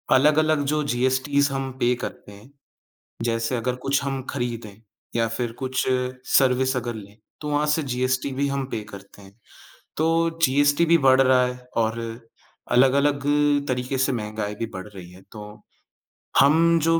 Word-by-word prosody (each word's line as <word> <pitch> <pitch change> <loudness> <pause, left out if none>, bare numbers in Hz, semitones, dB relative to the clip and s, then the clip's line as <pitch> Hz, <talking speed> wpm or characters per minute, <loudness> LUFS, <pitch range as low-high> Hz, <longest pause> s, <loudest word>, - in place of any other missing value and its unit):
अलग-अलग 155 +2 +3
जो 150 0 0
जीएसटीज़ 130 +2 +1
हम 135 -1 -3
पे 120 +1 +3
करते 105 - -7
हैं, 105 +6 -15 0.7
जैसे 115 +1 -1
अगर 125 +2 -2
कुछ 140 0 +1
हम 135 -1 -3
खरीदें 120 -5 -4 0.4
या 115 -1 +2
फिर 120 -2 -2
कुछ 130 -1 -1 0.4
सर्विस 130 0 +3
अगर 120 -2 -4
लें, 105 0 -11 0.2
तो 150 - -4
वहाँ 145 +1 +1
से 160 - -2
जीएसटी 130 +1 -1
भी 140 +2 0
हम 140 -1 -2
पे 110 - -3
करते 100 +1 -13
हैं। 100 +3 -17 0.6
तो 165 +1 +1
जीएसटी 145 +4 +3
भी 170 +1 +5
बढ़ 130 0 +6
रहा 130 -1 +4
है 125 0 -4 0.2
और 115 0 0 0.7
अलग-अलग 140 +3 +3 0.5
तरीके 125 +1 -2
से 130 +1 +1
महँगाई 105 -2 -4
भी 115 - -3
बढ़ 95 +2 -7
रही 90 -4 -12
है, 95 +1 -15
तो 105 -1 -11 0.8
हम 165 +4 +5
जो 165 0 +3
130 Hz, 160 wpm, -23 LUFS, 115-140 Hz, 0.8 s, बढ़